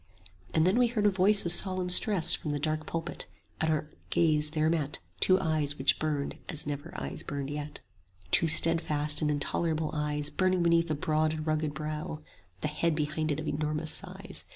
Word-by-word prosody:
15 - - -22
And 160 - +3
then 190 +6 +3
we 245 - +4
heard 225 -3 -1
a 205 - +5
voice 195 +2 +4
of 170 - 0
solemn 185 0 +4
stress 185 -2 +5
From 155 - -1
the 145 0 -2
dark 155 +1 -2
pulpit, 165 +1 -4 0.3
and 160 0 +1
our 155 -1 -2 0.2
gaze 155 -2 +2
there 155 0 0
met 155 -3 0 0.2
Two 185 0 +3
eyes 150 -3 0
which 135 - +2
burned 150 -2 -3
as 155 -5 -3
never 145 +3 -5
eyes - - -5
burned 140 0 -5
yet: 145 0 -6 0.5
Two 165 - +4
steadfast 150 -2 +3
and 150 - +1
intolerable 155 +2 -1
eyes 150 -1 -1
Burning 185 +2 +1
beneath 170 0 +2
a 155 - 0
broad 155 +1 0
and 155 -1 -5
rugged 155 -2 -1
brow; 155 0 -4
20 150 - -13 0.4
The - - -1
head 155 +2 -1
behind 155 +1 -2
it 145 - -2
of 155 - -5
enormous 150 +1 -2
size. - - -5
155 Hz, 200 wpm, -29 LUFS, 150-170 Hz, 0.5 s, a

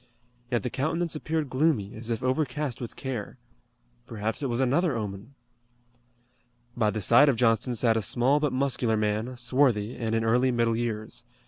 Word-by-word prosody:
Yet 120 -2 0
the 125 - -3
countenance 165 +4 -1
appeared 155 0 -2
gloomy, 130 -7 +1
as 115 +1 -7
if 115 +1 -2
overcast 130 -1 -1
with 120 - -6
care. 125 -6 -5 0.7
Perhaps 110 +2 -3
it 135 - -1
was 120 0 -1
another 140 +3 +2
omen! 105 +4 -6 1.4
By 110 -3 +2
the 105 -1 -3
side 130 +9 +6
of 135 - +2
Johnston 115 +1 +2
sat 115 0 +2
a 110 - +1
small 125 +8 +2
but 150 -2 0
muscular 130 -4 0
man, 110 +4 -1
swarthy, 120 -3 +1
and 115 -2 -2
in 115 - +1
early 125 +3 +3
middle 115 -2 +1
years. 110 -2 -3
120 Hz, 165 wpm, -27 LUFS, 110-135 Hz, 1.4 s, side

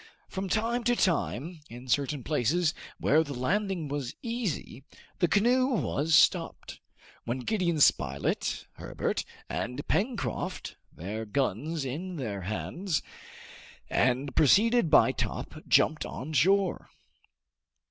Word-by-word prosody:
From 190 0 -4
time 230 +4 0
to 245 0 +3
time, 170 - 0
in 125 +2 -10
certain 135 +2 0
places 155 +5 +1 0.2
where 155 +3 +3
the 145 -3 -6
landing 180 +5 -1
was 140 -3 -4
easy, 230 - -3 0.4
the 175 - +3
canoe 245 +8 +3
was 165 - +1
stopped, - - +2 0.5
when 120 +2 -2
Gideon 175 - 0
Spilett, 70 - +1
Herbert, - - -2 0.2
and 120 - -4
Pencroft, 230 +5 -2 0.2
their 105 +6 -5
guns 135 - -1
in 170 +8 -4
their 110 - -4
hands, 155 - -2 0.9
and 130 +2 +1
preceded 210 - +4
by - - +6
Top, - - -4
jumped 155 -1 +3
on 155 +5 -6
shore. 190 +4 +2
155 Hz, 115 wpm, -29 LUFS, 130-195 Hz, 0.9 s, by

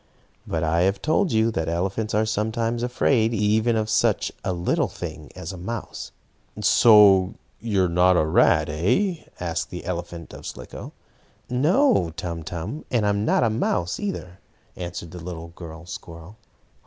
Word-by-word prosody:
But 80 0 -1
I 80 +1 +2
have 95 +2 +2
told 165 +4 +1
you 110 +1 +2
that 80 -6 -2
elephants 95 +6 -1
are 110 +1 +3
sometimes 115 +2 -1
afraid 120 -2 +2
of - - -2
even 110 +1 +2
such 110 +1 +1
a - - -1
little 85 -1 0
thing - - -8
as 90 - -6
a - - -8
mouse. 105 +6 -6 0.5
"So 100 -4 +6 0.2
you 105 -5 +1
are - - +2
not 90 +1 +4
a 75 - +3
rat, 80 - +4
eh?" 155 - 0
asked 85 -1 -3
the 90 - -7
elephant 85 -2 -5
of - - -9
Slicko. - - -8 0.6
"No, 145 - +3
Tum 85 -2 -4
Tum, 85 - -5
and 115 -4 +1
I'm 100 +1 +1
not - - +3
a 115 - +2
mouse, 90 -5 -1
either," 95 - -5 0.4
answered 85 -2 -6
the 90 -2 -9
little 85 -1 -7
girl 85 0 -10
squirrel. 85 +3 -10
95 Hz, 160 wpm, -24 LUFS, 85-110 Hz, 0.6 s, So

